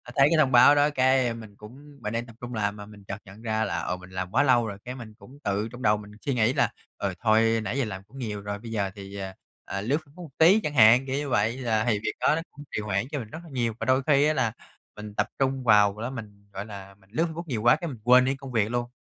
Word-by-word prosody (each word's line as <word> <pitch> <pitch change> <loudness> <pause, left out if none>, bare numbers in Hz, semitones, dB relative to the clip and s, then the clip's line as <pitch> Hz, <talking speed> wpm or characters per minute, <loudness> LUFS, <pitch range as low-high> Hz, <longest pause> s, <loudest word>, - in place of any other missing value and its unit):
thấy 140 -1 +6
cái 165 - +4
thông 140 -4 +4
báo 130 +4 +7
đó 145 +1 +4
cái, 130 -2 +3
ơ, 120 - -1
mình 110 -3 -11
cũng 140 +8 -14
mình 105 -1 -4
đang 115 +1 -2
tập 115 -2 -14
trung 125 0 -6
làm 100 -2 -1
mà 105 -1 -9
mình 105 -1 -14
chợt 95 0 -6
nhận 100 +2 -13
ra 110 -1 0
là, 85 -6 -2
ờ, 90 - -3
mình 90 0 -13
làm 95 0 -5
quá 135 +5 +3
lâu 120 -4 +3
rồi, 100 -2 -6
cái 125 +1 -5
mình 115 -4 -10
cũng 115 +6 -16
tự 100 +2 -1
trong 125 +1 -10
đầu 105 0 +3
mình 105 0 -11
suy 140 - +1
nghĩ 120 0 +2
là, 125 -5 +2 0.3
ừ, 100 -2 -2
thôi 115 0 +3
nãy 110 +5 -3
giờ 135 - +1
làm 95 -3 -6
cũng 130 +7 -16
nhiều 105 -5 -4
rồi, 100 0 -5
bây 115 +1 -9
giờ 100 -3 -1
thì, 100 0 -9
ờ, 95 -1 -5 0.3
ờ, 100 - -4
lướt 130 +8 +1
Facebook 155 +5 -12
một 165 - -10
tí 175 +7 +6
chẳng 150 - -2
hạn, 120 +1 +6
kiểu 135 0 -2
như 145 0 -2
vậy, 115 0 +1
là 110 -4 0
thì 105 -3 +2
việc 105 - -2
đó 150 - +3
nó 165 - -2
cũng 145 - -12
trì 105 - -2
hoãn 105 +1 -1
cho 145 - -2
mình 110 -4 -8
rất 160 - -8
là 170 - -13
nhiều. 120 -5 -1
Và - - -3
đôi 130 +1 +3
khi 145 -1 +5
á 155 - +3
là 125 -6 +1 0.4
mình 105 0 -8
tập - - +1
trung 135 -1 0
vào 105 -3 +4
đó, 115 - -2
mình, 105 -5 -10
gọi 100 +1 -5
là, 100 -2 -10
mình 95 0 -27
lướt 165 - +2
Facebook 170 +2 -6
nhiều 120 -7 -2
quá 120 - +6
cái 170 - -5
mình 130 -7 -7
quên 125 +2 +6
đi 135 +1 0
công 135 -1 -10
việc 110 -3 +1
luôn, 120 0 -2
115 Hz, 305 wpm, -26 LUFS, 105-130 Hz, 0.4 s, báo